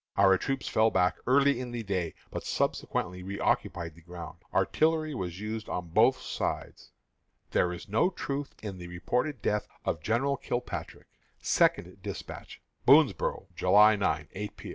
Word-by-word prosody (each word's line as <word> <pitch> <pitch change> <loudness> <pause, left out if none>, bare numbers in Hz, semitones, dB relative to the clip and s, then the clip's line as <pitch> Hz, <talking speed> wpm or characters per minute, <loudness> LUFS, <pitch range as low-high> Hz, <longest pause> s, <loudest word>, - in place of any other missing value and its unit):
Our 95 -1 +6
troops 135 -1 -2
fell 110 +1 +4
back 90 -4 +2
early 140 0 +4
in 125 -1 -4
the 120 -1 -4
day, 95 -5 -2 0.2
but - - -4
subsequently 90 0 -1
reoccupied 90 -3 -1
the 85 - -17
ground. 85 0 -9
Artillery 155 -1 +2
was 90 -7 -4
used 110 +1 -4
on 90 -1 -3
both - - +4
sides. - - -4 0.6
"There 90 - +2
is 90 - -7
no 110 - +3
truth 140 -6 -4
in 100 -4 -5
the 90 - -7
reported 120 - -2
death 105 -1 0 0.2
of 80 - -1
General 130 - +1
Kilpatrick." 120 0 -4 0.3
(SECOND - - +1
DESPATCH.) - - -8 0.2
"Boonsboro', - - +4
July 105 +3 +6
9, 75 -7 0
8 105 +2 -6
P. - - -8
105 Hz, 150 wpm, -29 LUFS, 90-125 Hz, 0.6 s, Our